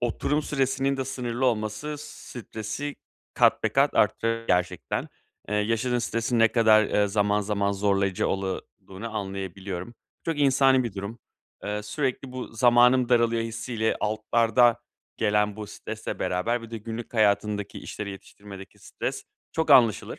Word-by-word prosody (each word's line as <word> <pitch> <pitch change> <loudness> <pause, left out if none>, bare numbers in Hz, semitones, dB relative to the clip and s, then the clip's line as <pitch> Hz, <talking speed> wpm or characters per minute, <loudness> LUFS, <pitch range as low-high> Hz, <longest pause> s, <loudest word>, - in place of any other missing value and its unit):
oturum 145 +5 0
süresinin 135 -1 0
de 135 - -2
sınırlı 125 -1 -2
olması, 110 +5 -1
stresi 125 -2 -7 0.4
kat - - +4
be - - +2
kat - - +2
arttırır 115 0 +1
gerçekten. 90 -2 -1 0.4
Eee, 105 - -2
yaşadığın 115 +4 +1
stresin 115 0 -1
ne 115 0 +6
kadar, 110 -2 +5
eee, 105 0 +2
zaman 105 +1 +1
zaman 100 -1 0
zorlayıcı 100 -1 +1
ola 95 -1 -2 0.3
duğunu 110 +4 -7
anlayabiliyorum. 95 0 -5 0.3
Çok 165 -2 -2
insani 135 -2 +4
bir 115 -5 -4
durum. 100 +4 -6 0.5
Eee, 105 0 -3
sürekli 130 +3 -3
bu 130 0 -5
"Zamanım 120 +1 +5
daralıyor." 115 -2 +3
hissi 115 +2 -5
ile 110 0 +1
altlarda 115 +2 +2 0.4
gelen 105 -1 +1
bu 105 - -6
stresle - - -6
beraber 115 +7 -1
bir 115 - -10
de 115 - -5
günlük 115 +3 -7
hayatındaki 105 -1 +1
işleri 105 -1 -6
yetiştirmedeki 100 0 -12
stres - - -5 0.3
çok 160 -2 -1
anlaşılır. 115 -7 +4
115 Hz, 145 wpm, -26 LUFS, 105-125 Hz, 0.5 s, ne